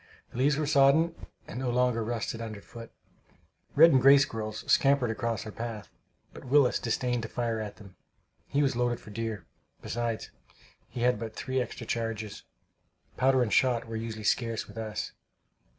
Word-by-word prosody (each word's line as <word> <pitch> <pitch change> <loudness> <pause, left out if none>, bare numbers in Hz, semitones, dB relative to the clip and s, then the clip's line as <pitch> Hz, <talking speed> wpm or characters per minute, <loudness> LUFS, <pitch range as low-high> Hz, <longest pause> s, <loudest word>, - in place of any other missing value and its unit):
The 120 - -6
leaves 140 +2 +3
were 155 - 0
sodden, 145 +3 +4 0.3
and 125 - -6
no 130 -1 -1
longer 125 -1 +1
rustled 115 0 -3
underfoot. 115 +1 -9 0.8
Red 165 +3 +8
and 130 - +4
gray 135 +2 +8
squirrels 110 -5 -2
scampered 135 -4 +3
across 115 0 -2
our 110 - -6
path, 115 -2 -6 0.4
but - - -11
Willis 135 0 +3
disdained 120 +1 -1
to 115 - -6
fire 115 -2 -2
at 105 -1 -5
them. 100 -3 -15 0.5
He 145 +1 +1
was 135 -3 +1
loaded 120 0 0
for 105 - -13
deer; 110 -2 -4 0.4
besides 120 -1 -3 0.6
he 120 - -6
had 125 -3 +2
but 110 -1 -6
three 130 0 -1
extra 125 -1 -6
charges. 110 -3 -3 0.7
Powder 130 0 +3
and 110 - -2
shot 125 -3 +3
were 115 - -6
usually 110 -1 -5
scarce 115 +1 0
with 115 - -9
us. 110 -1 -4
115 Hz, 165 wpm, -29 LUFS, 110-130 Hz, 0.8 s, Red